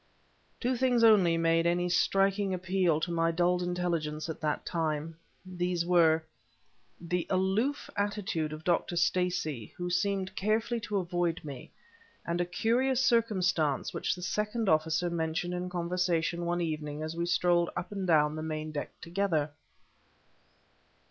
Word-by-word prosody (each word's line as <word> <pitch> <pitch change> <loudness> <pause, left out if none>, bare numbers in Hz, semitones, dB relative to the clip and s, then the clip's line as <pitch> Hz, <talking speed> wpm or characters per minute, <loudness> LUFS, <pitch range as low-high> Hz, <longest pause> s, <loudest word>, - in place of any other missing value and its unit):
Two 255 +1 0
things 245 -1 +2
only 195 -7 +6
made 165 0 +2
any 175 +1 +1
striking 195 +2 +2
appeal 185 -3 +1
to 175 - -2
my 165 0 +2
dulled 175 +2 +1
intelligence 170 -3 -2
at 160 - -6
that 150 -2 -1
time. 160 -1 -2 0.3
These 180 -1 -2
were: 165 -2 +4 0.8
the 175 0 -2
aloof 195 +10 0
attitude 200 -6 -1
of 155 +1 -7
Dr. 175 0 0
Stacey, 170 - 0
who 175 0 -3
seemed 195 +1 0
carefully 220 +4 0
to 210 -2 -3
avoid 175 -2 -1
me; 140 -4 -8 0.6
and 170 +1 -1
a - - +1
curious 245 +8 +1
circumstance 180 - +1
which - - -1
the 180 - -9
second 210 +3 -1
officer 160 +2 +2
mentioned 165 +1 -2
in 180 0 -3
conversation 175 -1 -1
one 175 0 0
evening 155 -2 -3
as 155 +1 -4
we 170 0 -2
strolled 175 -1 +2
up 180 - -4
and 195 -2 -3
down 150 -2 +3
the 155 - -4
main 155 0 -4
deck 145 -1 -4
together. 170 -4 -1
175 Hz, 145 wpm, -30 LUFS, 160-190 Hz, 0.8 s, only